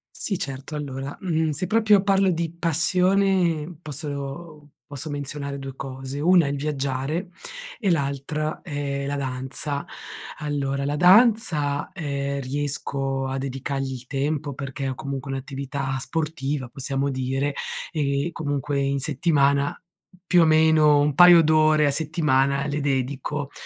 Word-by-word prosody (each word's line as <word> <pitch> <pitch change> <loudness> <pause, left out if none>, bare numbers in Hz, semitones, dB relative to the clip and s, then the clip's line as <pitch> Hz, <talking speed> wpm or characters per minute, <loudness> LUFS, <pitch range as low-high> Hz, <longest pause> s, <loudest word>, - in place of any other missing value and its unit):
Sì, 195 -4 -2
certo, 135 +2 -5
allora, 140 -1 -5
mhmm, 160 -4 0
se 165 +6 -2
proprio 215 -2 +4
parlo 195 -1 +3
di 165 -1 -1
passione 175 0 +1
posso 145 +1 -7 0.2
posso 145 +2 -6
menzionare 140 0 -5
2 135 -1 -7
cose: 135 +1 -6
una 170 -1 +4
è - - 0
il 145 - -2
viaggiare 140 +4 -2 0.5
e 200 -6 +1
l'altra 150 +1 -2
è 140 -4 -3
la 145 +1 -2
danza. 130 +2 -3 0.5
Allora, 140 -2 -2
la 145 +1 -1
danza, 180 - +4
ehm, 140 -5 -3
riesco 135 0 -2
a 135 0 -3
dedicargli 135 0 -3
il 125 -1 -9
tempo 145 +1 -2
perché 135 0 -4
ho 130 - -4
comunque 135 0 -5
un'attività 135 0 -4
sportiva, 150 -4 -2
possiamo 135 +1 -2
dire, 135 +2 -1 0.4
e 140 0 0
comunque, 145 -2 -2
in 140 0 0
settimana, 140 -1 +1 0.5
più 180 -1 +5
o - - +6
meno, 155 -2 +5
un 145 0 +2
paio 175 +1 +8
d'ore 155 -1 +4
a 140 - +3
settimana 140 -3 +1
le 145 0 -2
dedico 140 +1 -2
145 Hz, 135 wpm, -24 LUFS, 135-155 Hz, 0.5 s, paio